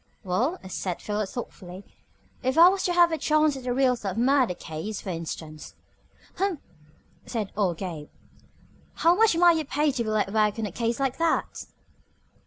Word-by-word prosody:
"Well," 235 - 0
said 185 -1 -4
Philo 210 -1 -3
thoughtfully, 190 -5 -8 0.6
"if 260 +3 -1
I 340 +2 +9
was 385 0 -1
to 355 - +1
have 345 -1 +5
a 320 - -2
chance 305 -1 +2
at 260 -1 -8
a - - 0
real 255 0 +3
tough 200 -5 -5
murder 255 -4 +2
case, 170 +7 -6
for - - -7
instance." 160 -2 -7 0.6
"Humph!" 380 -4 -1 0.7
said 220 -5 -3
old 190 -5 0
Gabe. 165 -6 -6 0.9
"How 335 - +4
much 430 -2 +3
might 345 -1 +5
you 315 - -1
pay 295 +2 +1
to 255 -3 -2
be 220 - -4
let 210 -2 0
work 215 -1 +2
on 225 - -2
a 205 - -5
case 230 +4 -2
like 270 0 -1
that?" 330 -1 -1
240 Hz, 180 wpm, -26 LUFS, 195-310 Hz, 0.9 s, I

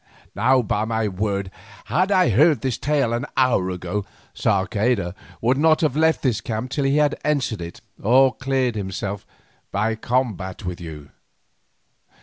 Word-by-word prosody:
Now 125 +5 +3
by 105 0 0
my 110 -1 0
word, 100 0 -2 0.3
had 185 +4 +1
I 185 -9 +4
heard 145 - +4
this 130 -3 -2
tale 140 -4 +1
an 120 +4 -2
hour 125 -8 +3
ago, 90 +3 -3 0.3
Sarceda 100 -1 0 0.3
should 125 +3 +3
not 155 0 +4
have 150 -5 +1
left 160 +1 +2
this 120 -5 +1
camp 115 +3 -4
till 140 -1 -1
he 135 +2 +2
had 150 -1 +2
answered 135 -9 0
it 85 0 -8 0.2
or 130 +4 +5
cleared 135 -2 0
himself 100 -1 -4 0.4
by 110 +3 0
combat 110 -6 -2
with 90 -1 -5
you. 75 -4 -9
115 Hz, 150 wpm, -22 LUFS, 100-135 Hz, 0.4 s, or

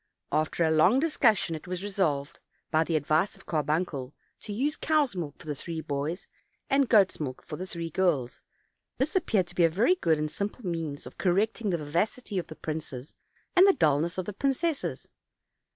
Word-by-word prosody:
After 155 +3 +1
a 160 - +2
long 175 +11 +5
discussion 240 - +2
it 155 +2 -7
was 180 +1 -4
resolved, 170 -7 -1 0.3
by 155 0 +4
the 165 0 -1
advice 155 +5 +1
of 195 - -18
Carbuncle, 150 -3 -1 0.2
to 210 - -8
use 275 +8 0
cows' 300 -8 +1
milk 155 -5 -4
for - - -14
the 150 - -2
three 160 +3 -5
boys, 150 +3 -3 0.4
and 275 -2 +3
goats' 200 -5 +4
milk 130 -4 -5
for 150 - -6
the 185 +4 -6
three 170 -2 -5
girls: 150 -9 0 0.6
this 275 +7 -1
appeared 220 - +2
to 175 - -10
be 175 - +3
a 165 - +6
very 210 - +3
good 165 - +1
and 150 0 -2
simple 205 +3 -4
means 165 -5 -3
of - - -12
correcting 205 +4 +1
the 175 - +1
vivacity 185 +8 -1
of 175 - -5
the 155 - -9
princes, 150 -4 -6 0.4
and 370 +2 +8
the 395 - +7
dullness 160 - +2
of 185 - -2
the 210 - -5
princesses. 275 - -1
175 Hz, 190 wpm, -28 LUFS, 155-210 Hz, 0.6 s, and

